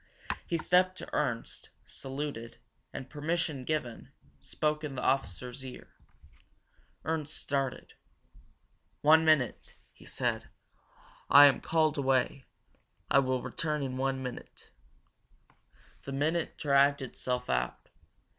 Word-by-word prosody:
He 170 Hz, -, 0 dB
stepped 185 Hz, +3 st, +3 dB
up -, -, -8 dB
to -, -, -30 dB
Ernst, 125 Hz, -6 st, -2 dB, 0.2 s
saluted, 135 Hz, -4 st, -6 dB, 0.3 s
and, 130 Hz, -, -7 dB
permission 150 Hz, -1 st, -2 dB
given, 125 Hz, -5 st, -3 dB, 0.3 s
spoke 150 Hz, 0 st, -1 dB
in 145 Hz, -3 st, -4 dB
the 125 Hz, -, -4 dB
officer's 125 Hz, +1 st, -1 dB
ear. 130 Hz, -1 st, -9 dB, 1.2 s
Ernst 155 Hz, -1 st, -2 dB
started. 135 Hz, -2 st, -3 dB, 1.1 s
"One 160 Hz, +2 st, +6 dB
minute," 155 Hz, -7 st, +2 dB, 0.2 s
he -, -, -16 dB
said. -, -, -2 dB, 0.8 s
"I 145 Hz, +1 st, +10 dB
am 140 Hz, -, +4 dB
called 155 Hz, -3 st, +1 dB
away 135 Hz, 0 st, +1 dB, 0.7 s
I -, -, +7 dB
will 130 Hz, -2 st, 0 dB
return 150 Hz, -3 st, -2 dB
in 130 Hz, -1 st, -3 dB
one 135 Hz, 0 st, -1 dB
minute." 125 Hz, -1 st, -8 dB, 1.3 s
The 140 Hz, -, -7 dB
minute 155 Hz, +4 st, -1 dB
dragged 140 Hz, -1 st, +3 dB
itself 125 Hz, 0 st, -3 dB
out. 60 Hz, 0 st, -2 dB
140 Hz, 115 wpm, -30 LUFS, 130-155 Hz, 1.3 s, I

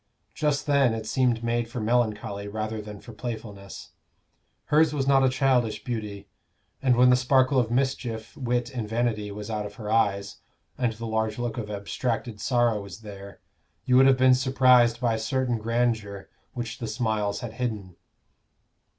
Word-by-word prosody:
Just 150 Hz, -2 st, 0 dB
then 140 Hz, -5 st, +3 dB
it 110 Hz, -1 st, -5 dB
seemed 120 Hz, -1 st, +1 dB
made 115 Hz, 0 st, -1 dB
for 120 Hz, -, -5 dB
melancholy 105 Hz, -3 st, -1 dB
rather 110 Hz, +1 st, -4 dB
than 105 Hz, -1 st, -9 dB
for 120 Hz, -, -12 dB
playfulness. 105 Hz, -3 st, -7 dB, 0.7 s
Hers 150 Hz, 0 st, +3 dB
was 135 Hz, -2 st, 0 dB
not 135 Hz, -1 st, +4 dB
a 130 Hz, -, +4 dB
childish 130 Hz, -4 st, +1 dB
beauty; 105 Hz, -5 st, -5 dB, 0.5 s
and 130 Hz, -3 st, +3 dB
when 125 Hz, +1 st, +6 dB
the -, -, +6 dB
sparkle 130 Hz, +1 st, +3 dB
of 120 Hz, -3 st, 0 dB
mischief, 120 Hz, -3 st, -2 dB
wit 120 Hz, -1 st, -1 dB
and 115 Hz, -4 st, -4 dB
vanity 110 Hz, -2 st, -1 dB
was 105 Hz, +2 st, -7 dB
out 105 Hz, -1 st, -2 dB
of 105 Hz, -, -13 dB
her 105 Hz, -1 st, -6 dB
eyes, 100 Hz, -3 st, +1 dB, 0.4 s
and 120 Hz, -3 st, 0 dB
the 115 Hz, +1 st, -7 dB
large 110 Hz, -1 st, -1 dB
look 120 Hz, -1 st, -3 dB
of 105 Hz, -2 st, -5 dB
abstracted 105 Hz, +2 st, -3 dB
sorrow 120 Hz, -4 st, +2 dB
was 100 Hz, +1 st, -10 dB
there, 100 Hz, -3 st, -10 dB, 0.4 s
you 125 Hz, -, +3 dB
would 135 Hz, +1 st, +7 dB
have 135 Hz, -1 st, +5 dB
been 130 Hz, 0 st, +6 dB
surprised 125 Hz, -2 st, +4 dB
by 120 Hz, -2 st, +1 dB
a 110 Hz, -, -2 dB
certain 125 Hz, 0 st, -1 dB
grandeur 110 Hz, -3 st, -1 dB, 0.2 s
which 120 Hz, -2 st, -5 dB
the 115 Hz, -, -4 dB
smiles 110 Hz, -3 st, -1 dB
had 115 Hz, -2 st, -6 dB
hidden. 110 Hz, -7 st, -4 dB
115 Hz, 170 wpm, -26 LUFS, 105-125 Hz, 0.7 s, would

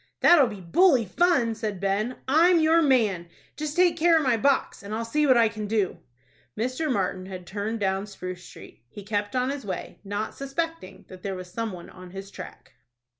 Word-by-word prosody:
"That'll 300 Hz, -7 st, +7 dB
be 205 Hz, -4 st, -8 dB
bully 250 Hz, -, +4 dB
fun," 245 Hz, -, +2 dB
said 215 Hz, -3 st, -4 dB
Ben. 200 Hz, +6 st, -1 dB
"I'm 335 Hz, +5 st, +5 dB
your 320 Hz, +1 st, +4 dB
man. 220 Hz, -, +2 dB, 0.3 s
Just 305 Hz, 0 st, -4 dB
take 355 Hz, -2 st, +3 dB
care 335 Hz, 0 st, +5 dB
of 315 Hz, -, +1 dB
my 255 Hz, -3 st, +3 dB
box, 275 Hz, +5 st, +1 dB
and 200 Hz, +2 st, -5 dB
I'll 230 Hz, +1 st, -3 dB
see 300 Hz, +6 st, +1 dB
what 260 Hz, -2 st, +6 dB
I 230 Hz, -1 st, +5 dB
can 215 Hz, -1 st, -5 dB
do." 205 Hz, -3 st, -1 dB, 0.6 s
Mr. 255 Hz, +7 st, -1 dB
Martin 185 Hz, -4 st, -1 dB
had 185 Hz, -2 st, -8 dB
turned 210 Hz, +4 st, -4 dB
down 195 Hz, 0 st, -1 dB
Spruce 185 Hz, -3 st, -7 dB
Street. 115 Hz, -, -14 dB
He 205 Hz, -, -10 dB
kept 205 Hz, +2 st, -2 dB
on 255 Hz, +1 st, +1 dB
his 280 Hz, -2 st, -5 dB
way, 190 Hz, -3 st, -6 dB
not 205 Hz, +2 st, -4 dB
suspecting 300 Hz, -, -5 dB
that 185 Hz, -1 st, -12 dB
there 195 Hz, 0 st, -4 dB
was 185 Hz, -1 st, -9 dB
some 230 Hz, -1 st, -2 dB
one 175 Hz, -2 st, -10 dB
on 185 Hz, -1 st, -12 dB
his 195 Hz, +2 st, -9 dB
track. -, -, -11 dB
220 Hz, 200 wpm, -26 LUFS, 195-280 Hz, 0.6 s, That'll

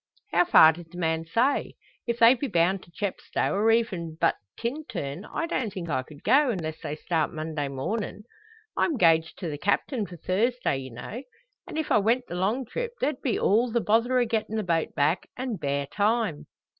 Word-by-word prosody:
"How -, -, +4 dB
far 160 Hz, -, +8 dB
did 165 Hz, 0 st, -12 dB
the 175 Hz, -, -10 dB
man 160 Hz, -1 st, 0 dB
say? 235 Hz, +12 st, +1 dB, 0.3 s
If 235 Hz, 0 st, 0 dB
they 230 Hz, +1 st, +8 dB
be 270 Hz, +2 st, -3 dB
bound 180 Hz, -1 st, +2 dB
to 170 Hz, -, -18 dB
Chepstow 200 Hz, +2 st, -2 dB
or 210 Hz, +3 st, +2 dB
even 185 Hz, -9 st, 0 dB
but -, -, +3 dB, 0.2 s
Tintern, 225 Hz, -, -4 dB
I 330 Hz, -, -1 dB
don't 255 Hz, -10 st, -2 dB
think 175 Hz, -3 st, -6 dB
I 130 Hz, -, 0 dB
could 145 Hz, +2 st, -14 dB
go; 285 Hz, 0 st, +4 dB
unless 160 Hz, -8 st, -3 dB
they 150 Hz, -2 st, -4 dB
start 160 Hz, 0 st, -1 dB
Monday 155 Hz, -2 st, -3 dB
mornin'. 200 Hz, +11 st, -4 dB, 0.5 s
I'm 320 Hz, -7 st, +1 dB
'gaged 165 Hz, -4 st, +3 dB
to 180 Hz, -, -5 dB
the 145 Hz, -2 st, -5 dB
Captain 205 Hz, -, 0 dB
for 175 Hz, -, -10 dB
Thursday, 210 Hz, -, 0 dB
ye 130 Hz, 0 st, -7 dB
know; 125 Hz, -, -7 dB, 0.5 s
an -, -, -6 dB
if 315 Hz, -, -2 dB
I 215 Hz, -, +5 dB
went 235 Hz, +5 st, +1 dB
the -, -, -8 dB
long 205 Hz, +9 st, 0 dB
trip, 480 Hz, -, -4 dB
there'd 270 Hz, 0 st, -1 dB
be 250 Hz, -, 0 dB
all 230 Hz, +4 st, +2 dB
the 235 Hz, -, +2 dB
bother 230 Hz, +4 st, +2 dB
o' 245 Hz, -, +3 dB
gettin' 220 Hz, -1 st, -2 dB
the 215 Hz, -, 0 dB
boat 165 Hz, -3 st, -1 dB
back 150 Hz, +5 st, +1 dB
an' 250 Hz, -4 st, -3 dB
bare 140 Hz, -2 st, -1 dB
time." 210 Hz, -2 st, 0 dB
200 Hz, 200 wpm, -26 LUFS, 160-235 Hz, 0.5 s, far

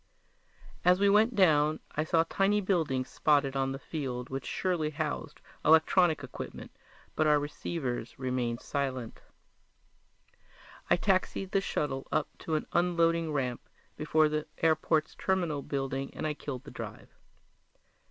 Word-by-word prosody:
As 180 Hz, +1 st, +5 dB
we 200 Hz, 0 st, +4 dB
went 220 Hz, +3 st, +4 dB
down 155 Hz, -5 st, +4 dB
I 155 Hz, -, -1 dB
saw 165 Hz, +1 st, +3 dB
tiny 200 Hz, +3 st, +2 dB
buildings 160 Hz, -10 st, 0 dB
spotted 145 Hz, -3 st, +2 dB
on 135 Hz, 0 st, 0 dB
the 135 Hz, -, -4 dB
field 130 Hz, -4 st, -5 dB
which 135 Hz, 0 st, -4 dB
surely 175 Hz, -5 st, 0 dB
housed 150 Hz, -, -4 dB, 0.2 s
electronic 160 Hz, 0 st, +4 dB
equipment, 130 Hz, -, -8 dB, 0.4 s
but 155 Hz, -, +2 dB
our 150 Hz, 0 st, +5 dB
receivers 145 Hz, -4 st, -4 dB
remained 125 Hz, -3 st, -2 dB
silent. 130 Hz, -4 st, -3 dB, 1.7 s
I -, -, +6 dB
taxied 190 Hz, 0 st, 0 dB
the 195 Hz, -, +2 dB
shuttle 135 Hz, -7 st, -2 dB
up 150 Hz, -, 0 dB
to 160 Hz, -, -2 dB
an 155 Hz, -, -1 dB
unloading 170 Hz, -2 st, +2 dB
ramp 130 Hz, -4 st, -1 dB, 0.3 s
before 155 Hz, 0 st, +3 dB
the 150 Hz, 0 st, -2 dB
airport's 160 Hz, -1 st, +2 dB
terminal 175 Hz, -6 st, -1 dB
building 135 Hz, 0 st, -3 dB
and -, -, -4 dB
I 155 Hz, -, 0 dB
killed 135 Hz, -3 st, -6 dB
the 145 Hz, -, -11 dB
drive. -, -, -8 dB
155 Hz, 135 wpm, -30 LUFS, 135-170 Hz, 1.7 s, I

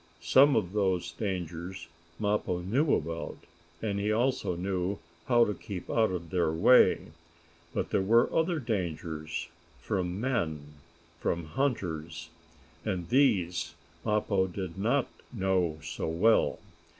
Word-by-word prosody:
Some 140 Hz, +2 st, +5 dB
of 95 Hz, -4 st, 0 dB
those 95 Hz, -5 st, 0 dB
dangers 90 Hz, -2 st, -4 dB, 0.3 s
Mappo 105 Hz, -4 st, 0 dB
knew 135 Hz, -, +2 dB
about, 80 Hz, +2 st, -4 dB, 0.5 s
and 100 Hz, -2 st, -1 dB
he 105 Hz, +1 st, 0 dB
also 120 Hz, -4 st, +1 dB
knew 95 Hz, +2 st, -2 dB, 0.3 s
how 120 Hz, -2 st, +5 dB
to 105 Hz, -, -1 dB
keep 100 Hz, -3 st, -7 dB
out 110 Hz, -1 st, +3 dB
of 85 Hz, -3 st, -5 dB
their 85 Hz, -4 st, +2 dB
way. 85 Hz, 0 st, +5 dB, 0.6 s
But -, -, -3 dB
there -, -, +2 dB
were 115 Hz, +5 st, +4 dB
other 165 Hz, +1 st, +2 dB
dangers 85 Hz, -, -3 dB, 0.3 s
from 90 Hz, -1 st, -2 dB
men 80 Hz, -, -2 dB, 0.5 s
from 85 Hz, -1 st, -1 dB
hunters 85 Hz, -, -2 dB, 0.5 s
and 90 Hz, -2 st, -3 dB
these 90 Hz, -, +2 dB, 0.3 s
Mappo 105 Hz, -3 st, +1 dB
did 95 Hz, -2 st, -5 dB
not 115 Hz, +7 st, +1 dB, 0.2 s
know 95 Hz, -7 st, 0 dB
so -, -, -4 dB
well. 95 Hz, +8 st, +3 dB
95 Hz, 125 wpm, -29 LUFS, 85-110 Hz, 0.6 s, Some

